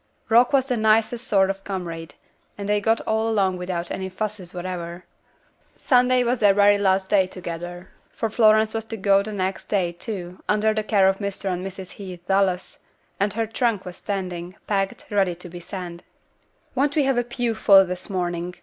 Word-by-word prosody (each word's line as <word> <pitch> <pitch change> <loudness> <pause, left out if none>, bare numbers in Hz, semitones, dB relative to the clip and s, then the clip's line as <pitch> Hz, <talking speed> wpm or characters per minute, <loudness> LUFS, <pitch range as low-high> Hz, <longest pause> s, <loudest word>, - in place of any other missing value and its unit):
Rock 240 +2 +5
was 270 -2 +3
the 250 -3 -1
nicest 225 +3 +2
sort 195 -3 +3
of 195 0 -9
comrade, 165 -6 -5 0.4
and 200 -1 -5
they 205 0 +2
got 225 +2 +2
along 220 -4 +1
without 180 -1 -4
any 190 0 -3
fusses 195 -2 -5
whatever. 175 -1 -6 0.7
Sunday 250 -1 +3
was 245 0 0
their 205 -2 +5 0.2
last 190 -1 +2
day 190 -2 +3
together, 175 0 -7 0.2
for 225 - -2
Florence 220 0 +4
was 225 0 -2
to 225 0 -6
go 195 0 +4
the 215 +2 -6
next 190 -2 -3
day, 185 -4 +1
too, 180 0 -7
under 215 +1 +3
the 215 - 0
care 200 -3 +3
of 190 0 +1
Mr. 200 -1 -3
and 180 +1 -4
Mrs. 190 -1 -7
Heath 185 -3 -9
Dallas, 190 -2 +1 0.4
and 200 +1 +1
her 225 +1 0
trunk 225 -3 -1
was 180 0 -8
standing, 180 -3 -4
packed, 195 -2 -1
ready 195 -4 +2
to 180 +1 -11
be 175 +1 -8
sent. 175 -1 -7 0.7
"Won't 280 +2 +1
we 300 - +3
have 270 -2 +2
a - - +1
pew 240 -1 -2
full 195 -3 +6
this 180 +2 -6
morning?" 175 -2 -2
195 Hz, 185 wpm, -23 LUFS, 180-220 Hz, 0.7 s, full